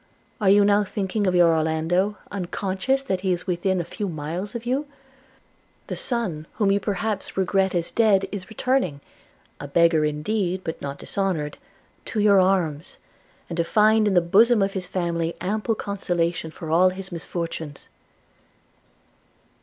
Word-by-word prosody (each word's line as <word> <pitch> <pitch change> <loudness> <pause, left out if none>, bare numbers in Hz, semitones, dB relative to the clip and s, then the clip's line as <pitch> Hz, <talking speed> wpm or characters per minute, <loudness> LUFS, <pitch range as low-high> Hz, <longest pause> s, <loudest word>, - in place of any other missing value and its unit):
Are 195 - +4
you 200 +1 +6
now 205 0 +4
thinking 200 0 -2
of 180 - +2
your 170 -2 +5
Orlando, 165 +6 0
unconscious 195 +7 -1
that 190 -8 -2
he 190 -1 0
is 180 0 -2
within 185 0 0
a - - -1
few 205 +2 -4
miles 170 +7 -5
of 235 0 -5
you? 270 +4 -1 1.0
The - - -5
son 190 - -2
whom 205 -2 +1
you 200 - +3
perhaps 205 0 -2
regret 190 0 +1
as 170 -1 -1
dead 205 -4 +3
is 190 -3 -6
returning 220 - 0 0.3
– - - -36
a 145 - -6
beggar 165 +1 +3
indeed, 180 +5 -1
but 160 - -5
not 140 0 -5
dishonoured 180 -7 -2 0.3
– - - -37
to 220 - -3
your 205 -2 +5
arms, 180 -5 0 0.5
and 170 - -6
to 170 - +2
find 215 +4 +4
in 195 - +1
the 175 - +6
bosom 215 +6 +4
of 195 0 -1
his 185 -2 -3
family 170 -2 -2
ample 215 +4 -1
consolation 175 -5 -2
for 160 0 -7
all 180 +3 +5
his 190 +1 -7
misfortunes.' 165 -3 -5
190 Hz, 160 wpm, -24 LUFS, 170-205 Hz, 1.0 s, you